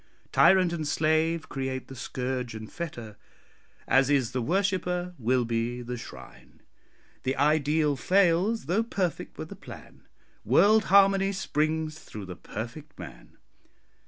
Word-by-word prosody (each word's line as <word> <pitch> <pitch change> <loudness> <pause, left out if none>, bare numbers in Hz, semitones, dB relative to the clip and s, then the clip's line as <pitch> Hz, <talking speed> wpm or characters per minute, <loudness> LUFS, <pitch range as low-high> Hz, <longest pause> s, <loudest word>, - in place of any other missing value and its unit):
Tyrant 185 -2 +5
and 155 -3 -3
slave 160 +2 +1
create 130 -1 -4
the 135 - -10
scourge 125 -1 -4
and 110 0 -8
fetter 120 -11 -7 0.7
As 135 +2 +4
is 135 -5 +2
the 130 - -2
worshipper, 180 +2 -1
will 125 +1 +1
be 120 +1 -2
the 125 +1 -5
shrine. 115 - -12 0.6
The 130 +1 -1
ideal 150 0 +2
fails, 185 - +2
though 180 +9 +1
perfect 195 -7 -3
were - - -5
the - - -10
plan, - - -13 0.4
World 205 - +4
harmony 195 0 +5
springs 155 -4 -1
through 105 -2 -9
the 90 -1 -8
perfect 120 - -8
man. 60 -9 -11
150 Hz, 130 wpm, -27 LUFS, 125-180 Hz, 0.7 s, Tyrant